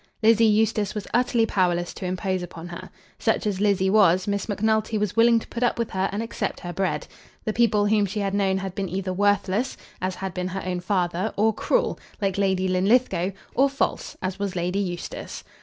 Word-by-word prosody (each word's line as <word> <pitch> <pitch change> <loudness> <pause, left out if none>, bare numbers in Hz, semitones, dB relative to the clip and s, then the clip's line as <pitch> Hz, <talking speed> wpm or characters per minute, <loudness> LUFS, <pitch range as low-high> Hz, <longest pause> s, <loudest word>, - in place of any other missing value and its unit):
Lizzie 225 +1 +6
Eustace 215 -1 +2
was 210 - -4
utterly 240 -2 +3
powerless 175 -4 0
to 185 - -5
impose 185 0 -1
upon 170 -1 -8
her. 175 +2 -8 0.3
Such 225 - +1
as 200 -2 -1
Lizzie 195 -2 +2
was, 185 -3 +5
Miss 200 +1 -1
Macnulty 220 +1 +1
was 210 -2 -1
willing 230 0 +5
to 225 - -3
put 235 - -5
up 245 - +2
with 235 -1 -2
her 190 +1 0
and 205 +3 -2
accept 230 - -4
her 175 -1 -5
bread. 195 +1 -1 0.4
The 215 - 0
people 215 -3 +3
whom 205 -1 +3
she 210 +3 -4
had 195 -1 -1
known 195 -1 +2
had 190 -1 -4
been 195 -1 -3
either 185 +1 -2
worthless, 205 +4 +1 0.2
as 185 0 -1
had 190 -1 -5
been 180 0 -2
her 190 +1 -4
own 180 -1 -2
father, 180 +1 0
or 220 +2 +3
cruel, - - 0 0.2
like 195 -2 -1
Lady 190 -1 +1
Linlithgow, 185 0 +2 0.2
or 275 +2 +4
false, 275 +1 -2
as 185 +1 -3
was 200 -2 -2
Lady 180 +2 -1
Eustace. 175 -3 -5
195 Hz, 205 wpm, -24 LUFS, 185-215 Hz, 0.4 s, Lizzie